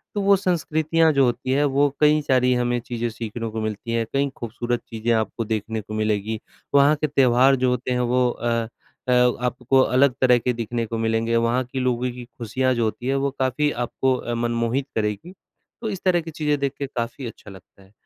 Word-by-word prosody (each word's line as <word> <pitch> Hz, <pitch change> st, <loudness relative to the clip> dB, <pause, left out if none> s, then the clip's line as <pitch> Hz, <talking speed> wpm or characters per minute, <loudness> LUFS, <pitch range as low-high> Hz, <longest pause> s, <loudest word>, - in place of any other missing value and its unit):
तो 205 Hz, -, 0 dB
वो 200 Hz, 0 st, +5 dB
संस्कृतियाँ 165 Hz, -3 st, +1 dB
जो 140 Hz, -1 st, +4 dB
होती 125 Hz, +1 st, -1 dB
हैं, 140 Hz, +2 st, +3 dB
वो 145 Hz, 0 st, +2 dB
कई 150 Hz, 0 st, +4 dB
सारी 125 Hz, -3 st, +2 dB
हमें 120 Hz, 0 st, 0 dB
चीज़ें 120 Hz, 0 st, -3 dB
सीखने 115 Hz, 0 st, -5 dB
को 110 Hz, 0 st, -4 dB
मिलती 110 Hz, +1 st, -4 dB
हैं, 115 Hz, 0 st, 0 dB
कई 140 Hz, +1 st, +1 dB
खूबसूरत 120 Hz, +1 st, -3 dB
चीज़ें 115 Hz, +1 st, -2 dB
आपको 110 Hz, +1 st, -1 dB
देखने 110 Hz, 0 st, -3 dB
को 105 Hz, -, -9 dB
मिलेगी। 110 Hz, 0 st, -1 dB, 0.4 s
वहाँ 140 Hz, +2 st, +6 dB
के 155 Hz, -, +2 dB
त्यौहार 135 Hz, -1 st, +4 dB
जो 130 Hz, -1 st, +1 dB
होते 125 Hz, 0 st, -2 dB
हैं 125 Hz, -, +1 dB
वो 125 Hz, +1 st, +2 dB
अ 115 Hz, -1 st, -1 dB, 0.4 s
अ, -, -, +1 dB, 0.3 s
आपको 125 Hz, +1 st, +1 dB
अलग 130 Hz, +1 st, +3 dB
तरह 125 Hz, -2 st, +5 dB
के 125 Hz, +1 st, 0 dB
दिखने 115 Hz, 0 st, -3 dB
को 115 Hz, +1 st, -4 dB
मिलेंगे, 115 Hz, +1 st, 0 dB
वहाँ 115 Hz, +2 st, +2 dB
के 130 Hz, +2 st, -5 dB
लोगों 125 Hz, -1 st, 0 dB
की 125 Hz, 0 st, -9 dB
खुशियाँ 130 Hz, +3 st, 0 dB
जो 120 Hz, -, 0 dB
होती 110 Hz, +3 st, -3 dB
हैं, 135 Hz, -, +1 dB
वो 135 Hz, 0 st, 0 dB
काफ़ी 130 Hz, +3 st, +1 dB
आपको 130 Hz, +1 st, 0 dB
अ, 120 Hz, -, -4 dB
मनमोहित 120 Hz, +3 st, -1 dB
करेगी। 105 Hz, -, -2 dB, 0.5 s
तो 225 Hz, -, -2 dB
इस 195 Hz, -3 st, -5 dB
तरह 180 Hz, -2 st, +3 dB
की 165 Hz, 0 st, -8 dB
चीज़ें 150 Hz, -1 st, 0 dB
देख 140 Hz, -1 st, -1 dB
के 140 Hz, -, -1 dB
काफ़ी 125 Hz, 0 st, -5 dB
अच्छा 110 Hz, -2 st, -11 dB
लगता 95 Hz, +1 st, -16 dB
है। 95 Hz, -, -22 dB
125 Hz, 210 wpm, -23 LUFS, 115-135 Hz, 0.5 s, वहाँ